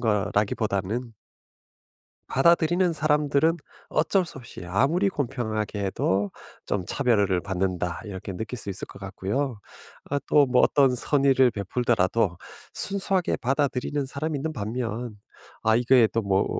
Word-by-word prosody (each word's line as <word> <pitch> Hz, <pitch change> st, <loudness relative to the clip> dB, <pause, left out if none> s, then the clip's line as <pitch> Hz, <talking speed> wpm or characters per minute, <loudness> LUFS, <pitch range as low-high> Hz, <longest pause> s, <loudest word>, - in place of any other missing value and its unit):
거라기보다는 105 Hz, +1 st, -1 dB, 1.2 s
받아들이는 170 Hz, +4 st, +3 dB
사람들은 150 Hz, +1 st, +2 dB, 0.3 s
어쩔 180 Hz, +4 st, +2 dB
수 150 Hz, -, -9 dB
없이 120 Hz, -7 st, -10 dB
아무리 140 Hz, -, +2 dB
공평하게 110 Hz, -, -3 dB
해도 95 Hz, +1 st, 0 dB, 0.4 s
좀 95 Hz, -3 st, -1 dB
'차별을 105 Hz, -9 st, +1 dB
받는다.' 90 Hz, -2 st, -2 dB
이렇게 95 Hz, -2 st, -6 dB
느낄 110 Hz, +6 st, -5 dB
수 100 Hz, -, -5 dB
있을 95 Hz, -, -5 dB
것 -, -, -13 dB
같고요. 105 Hz, +5 st, -3 dB, 0.5 s
아 145 Hz, -, +1 dB
또 145 Hz, -1 st, +5 dB
뭐 125 Hz, -1 st, +3 dB
어떤 135 Hz, -3 st, +4 dB
선의를 135 Hz, 0 st, +3 dB
베풀더라도 110 Hz, -3 st, 0 dB, 0.4 s
순수하게 195 Hz, -2 st, +2 dB
받아들이는 135 Hz, +1 st, -1 dB
사람이 145 Hz, +2 st, -3 dB
있는 160 Hz, +3 st, -3 dB
반면 115 Hz, -1 st, -4 dB, 0.4 s
'아 110 Hz, 0 st, +4 dB
이거 120 Hz, -1 st, +5 dB
또 115 Hz, -, 0 dB
뭐 100 Hz, -1 st, +1 dB
120 Hz, 295 characters per minute, -25 LUFS, 100-145 Hz, 1.2 s, 또